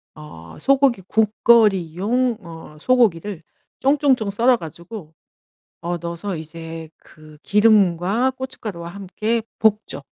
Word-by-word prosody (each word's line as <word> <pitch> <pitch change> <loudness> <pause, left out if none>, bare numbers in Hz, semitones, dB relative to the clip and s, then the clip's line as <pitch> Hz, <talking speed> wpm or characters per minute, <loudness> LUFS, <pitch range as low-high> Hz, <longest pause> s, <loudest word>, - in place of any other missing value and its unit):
어 85 - -12
소고기 270 - +2
국거리용 215 +1 +2
어 165 -3 -12
소고기를 205 -6 +1 0.4
쫑쫑쫑 270 -5 +2
썰어 240 +4 +3
가지고 170 +1 -10 0.7
어 175 0 -3
넣어서 170 +3 -5
이제 160 0 -8
그 155 -1 -17
기름과 210 +2 +3
고춧가루와 215 -10 -7
함께 200 +5 -3 0.2
볶죠. 215 -8 0
200 Hz, 235 characters per minute, -21 LUFS, 165-230 Hz, 0.7 s, 썰어